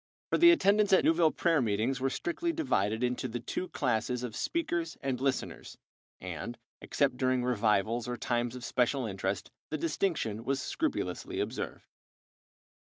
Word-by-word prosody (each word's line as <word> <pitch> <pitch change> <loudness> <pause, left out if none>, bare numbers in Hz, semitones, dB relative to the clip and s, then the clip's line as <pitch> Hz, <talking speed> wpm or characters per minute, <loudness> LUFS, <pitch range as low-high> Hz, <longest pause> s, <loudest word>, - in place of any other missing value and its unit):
For - - +2
the 345 - +9
attendants 210 - +4
at 190 - +6
Newville 165 0 +5
prayer 165 -2 +2
meetings 115 +4 0
were 135 +1 +1
strictly 335 - -2
divided 115 - 0
into 125 +1 0
the 120 0 -4
two 180 +9 -4
classes 125 -3 -1
of 115 -3 -5
speakers 175 - -2
and 130 -2 -1
listeners, 135 -2 -2 0.4
and, 95 +7 -6 0.2
except 135 -3 0
during 130 -1 +1
revivals 115 -1 +1
or 120 0 -3
times 120 0 -1
of 125 -2 -7
special 125 +2 +1
interest, 95 -1 -3 0.2
the 155 - -2
distinction 150 - -1
was 135 +2 0
scrupulously 315 - -2
observed. - - -4
125 Hz, 150 wpm, -31 LUFS, 115-165 Hz, 0.4 s, the